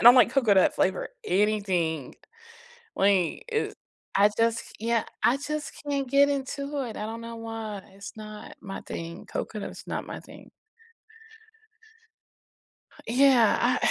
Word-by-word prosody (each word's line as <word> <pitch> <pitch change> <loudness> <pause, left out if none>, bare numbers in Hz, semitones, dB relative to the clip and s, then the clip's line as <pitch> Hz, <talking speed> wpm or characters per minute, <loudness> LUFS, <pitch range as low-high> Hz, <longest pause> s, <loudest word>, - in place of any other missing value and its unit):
I - - -4
don't 240 +1 +11
like 250 -2 +6
coconut-flavor 200 -7 +3 0.2
anything. 185 - +1 0.8
Wait, 195 -4 +2
is 445 -1 0 0.4
I 205 +1 +6
just 230 0 +3
c - - -15
Yeah, 230 0 +1 0.2
I 250 - +5
just 300 +1 -4 0.2
can't 275 -2 -1
get 280 +1 +5
into 280 +1 -2
it, 230 - -6
I 210 - -3
don't 225 +1 -5
know 230 0 -7
why, 225 -3 -5
it's 195 0 -9
not 215 -1 -9
my 195 -1 -6
thing, 170 +2 -7
coconut 215 -2 -4
is - - -10
not - - -3
my - - -6
thing. - - -14 2.6
Yeah, 250 -2 +5 0.2
I - - +4
225 Hz, 140 wpm, -27 LUFS, 200-265 Hz, 2.6 s, don't